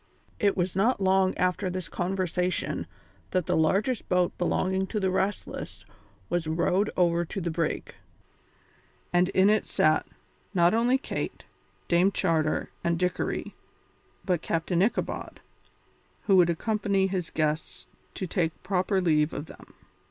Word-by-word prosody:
It 200 -2 +2
was 175 0 0
not 225 +6 +2
long 190 -1 +2
after 185 +1 0
this 185 0 -4
conversation 180 -1 -1 0.4
that 185 -3 0
the - - +1
largest 200 +9 +1
boat 180 -1 +2
belonging 190 +2 0
to 215 - -2
the 190 -2 +1
Restless 195 +2 -3 0.4
was 175 -2 -1
rowed 180 +5 +1
over 170 -1 +3
to 195 - -5
the 170 -2 -2
brig, 165 -1 -2 1.2
and 175 +1 +3
in 190 0 +4
it 215 +1 +2
sat, 155 0 +2 0.5
not 175 +1 +4
only 240 +3 +3
Kate, 270 - -5 0.4
Dame 180 +3 +4
Charter, 160 -5 0
and 170 0 +1
Dickory, 180 +1 -2 0.7
but 180 -4 +1
Captain 170 +1 0
Ichabod, 215 +5 -1 0.8
who 195 - +4
would 175 -2 +6
accompany 200 +2 +1
his 185 -3 -2
guests 155 0 -2 0.3
to 190 - -3
take 165 -2 -2
proper 190 0 +1
leave 155 -3 +2
of 145 - -4
them. - - -15
180 Hz, 135 wpm, -27 LUFS, 170-195 Hz, 1.2 s, would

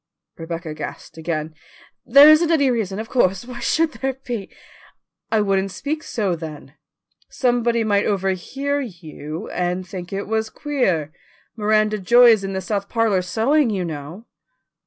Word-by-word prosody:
Rebecca 165 -1 -6
gasped 155 +1 -8
again. 160 -1 -3 0.5
"There 280 +1 +9
isn't 310 +2 +6
any 285 -5 +3
reason, 205 -5 -2
of 220 +1 -5
course. 195 -4 +1
Why 250 -1 -8
should 325 -1 +1
there 270 -2 -3
be?" 245 -6 -6 0.8
"I 220 -1 +3
wouldn't 195 -1 +1
speak 295 +10 -4
so, 205 - -2
then. 155 -4 -9 0.6
Somebody 240 -2 +1
might 205 -2 +1
overhear 205 +9 -1
you 160 - -8
and 180 +1 -2
think 180 -1 -7
it 195 +1 -3
was 220 0 -1
queer. 190 - -1 0.4
Miranda 215 -1 +1
Joy 240 +5 +6
is 215 -3 +2
in 195 0 -4
the 190 - -2
south 200 +1 -3
parlour 225 -5 +1
sewing, 235 +9 +1
you 190 -4 -2
know." 160 +6 -7
205 Hz, 150 wpm, -21 LUFS, 180-240 Hz, 0.8 s, There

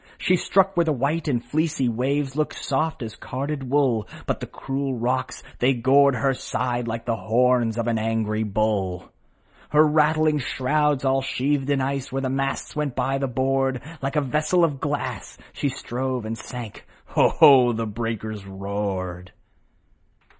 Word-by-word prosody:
She 185 - +2
struck 195 +2 +2
where 170 - +4
the 160 - 0
white 145 +5 -1
and 120 -5 0
fleecy 155 -4 0
waves 135 +4 -1
Looked 155 0 -1
soft 145 0 -1
as 110 -1 -7
carded 135 0 -4
wool, 125 -8 +2 0.2
But - - -1
the - - -6
cruel 135 0 -3
rocks, 130 +2 -2 0.2
they 130 +2 +3
gored 135 +3 +4
her 135 +1 +1
side 120 0 -2
Like 115 0 -4
the 115 - 0
horns 115 +2 +2
of 115 - -1
an 115 -2 0
angry 110 -1 -1
bull. 100 -4 -1 0.6
Her 150 +1 +5
rattling 155 0 +3
shrouds, 140 +2 0
all 135 0 +2
sheathed 135 +1 -1
in 140 -2 +2
ice, 135 0 -2
With 135 +1 -2
the 130 - -1
masts 135 0 -2
went 150 -4 -2
by 135 +1 0
the 135 - -1
board; 130 +1 0 0.2
Like 135 +2 -3
a 150 - +3
vessel 155 +6 +1
of 145 -5 +1
glass, - - -3 0.2
she 140 - -1
stove 130 -2 -3
and 110 +1 -3
sank, 115 -1 -8 0.2
Ho! - - +4
Ho! 130 -4 +7
the 115 0 -2
breakers 110 -1 -4
roared 95 -2 -4
130 Hz, 165 wpm, -24 LUFS, 115-140 Hz, 0.6 s, Ho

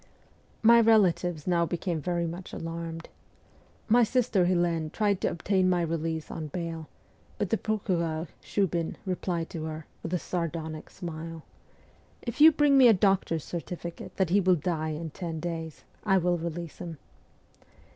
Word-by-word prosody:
My 235 +1 +8
relatives 180 -8 +3
now 175 -2 +2
became 170 -1 -2
very 175 +1 -1
much 175 +2 -6
alarmed. 165 0 -5 0.8
My 235 +2 +5
sister 230 -5 +2
Helene 175 -3 +1
tried 205 +1 0
to - - +2
obtain 185 +1 +1
my 175 -1 +2
release 160 -1 -2
on 155 -2 -5
bail, 165 0 -5 0.5
but 200 - -2
the 225 - +3
procureur, 170 -6 -1 0.2
Shiibin, 175 -5 -1
replied 180 -3 -2
to 160 -2 -4
her, 155 -1 -6 0.2
with 165 - -5
a - - +2
sardonic 165 -3 -4
smile, 165 -2 -7 0.4
' - - -30 0.3
If 235 +4 -4
you 320 +1 +10
bring 290 -2 +4
me 255 - +9
a 230 - +8
doctor's 185 -5 +2
certificate 170 0 -6
that 185 -3 +1
he 200 +2 +5
will 185 -1 +4
die 160 -1 -2
in 155 +1 -4
ten 165 -1 -5
days, 165 -2 -5 0.2
I 195 -3 +4
will 175 -1 +1
release 170 0 -5
him.' 170 -3 -6
170 Hz, 155 wpm, -28 LUFS, 165-190 Hz, 0.8 s, you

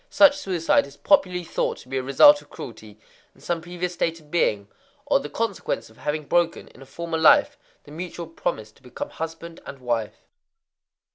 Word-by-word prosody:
Such 290 -8 +6
suicide 180 - +1
is 140 0 -15
popularly 180 -1 +2
thought - - -2
to - - -15
be 135 - -5
a - - -2
result 290 - +6
of - - -20
cruelty 110 -3 -10 0.4
in - - -22
some 170 -1 -2
previous 175 +1 -4
state 165 -1 -1
of 150 -1 -21
being, 105 -12 +1 0.4
or - - +3
the 150 - -7
consequence 215 - -3
of 110 - -21
having 150 0 -3
broken, 170 +2 0
in - - -18
a 135 - -12
former 165 +2 -4
life, 290 - +5 0.3
the 145 - -15
mutual 170 +1 -6
promise 110 -9 -4
to - - -27
become 125 -2 -7
husband 165 +1 -7
and 140 - -9
wife. 120 -4 -3
165 Hz, 190 wpm, -24 LUFS, 135-175 Hz, 0.4 s, Such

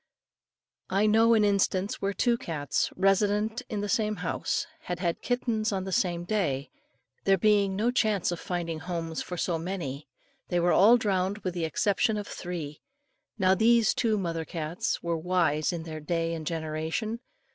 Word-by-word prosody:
I 195 +3 +2
know 225 +2 +5
an 215 -1 +4
instance 200 -1 +1
where 195 - 0
two 235 +4 +2
cats, 160 - -2
resident 205 +4 +2
in 210 -2 -2
the 205 - -2
same 215 +1 +1
house, 180 -3 -2 0.2
had 180 - -3
had 170 -1 -2
kittens 230 -3 0
on 190 -2 -1
the 190 - -5
same 175 -2 0
day. 170 -9 -1 0.5
There 195 0 +4
being 200 -1 +3
no 225 +5 +1
chance 215 -7 +1
of 175 - -4
finding 170 -3 -3
homes 165 -2 -4
for 180 - -6
so 170 -1 -1
many, 160 -6 -5 0.4
they 175 - 0
were 175 +1 +3
all 220 +6 +7
drowned 195 -3 0
with 185 - -2
the 170 -2 -1
exception 205 +6 +1
of 205 - -4
three. 165 -5 -6 0.6
Now 190 -2 +4
these 225 +2 +4
two 220 -3 +1
mother 165 -4 -2
cats 160 +1 -3
were 170 -1 -1
wise 160 -3 +1
in 170 -2 -4
their 160 -1 -6
day 165 +2 -1
and 160 -2 -5
generation. 165 +8 -3
185 Hz, 170 wpm, -28 LUFS, 165-210 Hz, 0.6 s, all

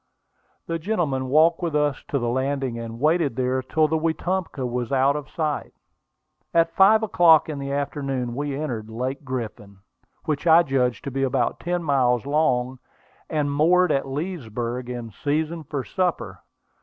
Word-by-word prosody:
The 165 0 -3
gentleman 155 -9 -1
walked 160 +5 +4
with 165 -3 -2
us 145 -2 0
to 140 - -1
the 120 -3 -1
landing, 130 0 -1
and 115 0 -7
waited 155 -2 +2
there 130 0 0
till 155 +4 +1
the 160 +1 0
Wetumpka 165 -2 -2
was 125 0 -3
out 135 +1 +3
of 150 -1 -5
sight. 155 -3 -3 0.8
At 165 0 +3
five 215 +3 +6
o'clock 170 -7 +5
in 150 -2 -4
the 140 0 -4
afternoon 140 -3 -2
we 145 +2 -3
entered 115 -8 -4
Lake 130 +5 -4
Griffin, 110 -6 -6 0.5
which 155 +1 -2
I 165 +1 +7
judged 130 -4 0
to 140 - -5
be 135 +1 -2
about 130 -3 0
ten 175 0 -2
miles 130 -5 +2
long, 130 -4 +1 0.5
and 150 -2 0
moored 170 +4 +3
at 135 -1 0
Leesburg 125 - -4
in 120 -2 -6
season 155 - -2
for 140 -2 -3
supper. 180 +3 -2
140 Hz, 160 wpm, -24 LUFS, 125-160 Hz, 0.8 s, I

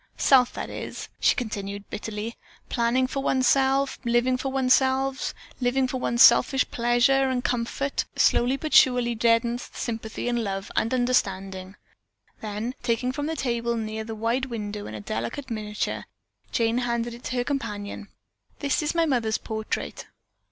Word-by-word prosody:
Self, 255 -3 +5
that - - -5
is - - -6
it," - - -10
she - - +4
continued 200 -5 -4
bitterly, 220 +2 -5 0.3
"planning 240 +2 +2
for 270 +1 -3
oneself, 270 +1 +2
living 240 +1 +2
for 265 +1 -3
oneself, 265 0 +2 0.3
living 260 +1 +1
for 260 - -3
one's 235 -1 +4
selfish 250 +2 +6
pleasure 245 +3 +3
and 250 -1 -1
comfort, 245 +3 -1
slowly 250 +3 +3
but 310 +2 -5
surely 245 -2 +5
deadens 235 +1 +1
sympathy 225 0 -4
and 240 -1 0
love 195 -1 -4
and 225 - +1
understanding." 195 -6 0 0.6
Then 215 +3 -4
taking 245 +1 0
from 290 +2 -3
the 320 - -2
table 235 -4 -1
near 220 0 -3
the 225 0 -6
wide 230 +4 0
window 210 -3 -5
a 110 0 -6
delicate 120 - -4
miniature, 210 -1 -3 0.5
Jane 230 +1 +1
handed 235 -1 -1
it 240 - -11
to 255 - -3
her 245 - +1
companion. 210 -7 -4 0.5
"That 285 +1 0
is 300 +2 -1
my 335 -1 +3
mother's 235 -7 +1
portrait." 220 -1 -4
240 Hz, 150 wpm, -25 LUFS, 220-260 Hz, 0.6 s, selfish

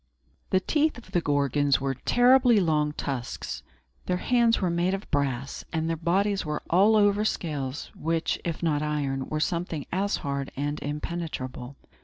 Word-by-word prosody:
The 185 - +3
teeth 300 +9 +1
of 240 - -13
the 175 - +2
Gorgons 145 -1 +2
were 135 0 -1
terribly 245 - +4
long 155 -4 +2
tusks; 130 -5 -4 0.5
their 180 - +1
hands 235 +2 +3
were 185 -3 0
made 175 +3 +1
of 195 - -8
brass; 140 -2 -1
and 160 -1 -1
their 165 - 0
bodies 195 +5 +1
were 150 -1 -3
all 200 +6 +5
over 205 0 +4
scales, 145 -9 -3
which, 165 +1 -1
if 170 0 -4
not 150 -3 +1
iron, 140 -3 -1
were 155 - -1
something 165 -2 -2
as 200 +2 +1
hard 140 -1 -2
and 145 +2 -2
impenetrable. 145 -4 -5
160 Hz, 160 wpm, -27 LUFS, 145-195 Hz, 0.5 s, all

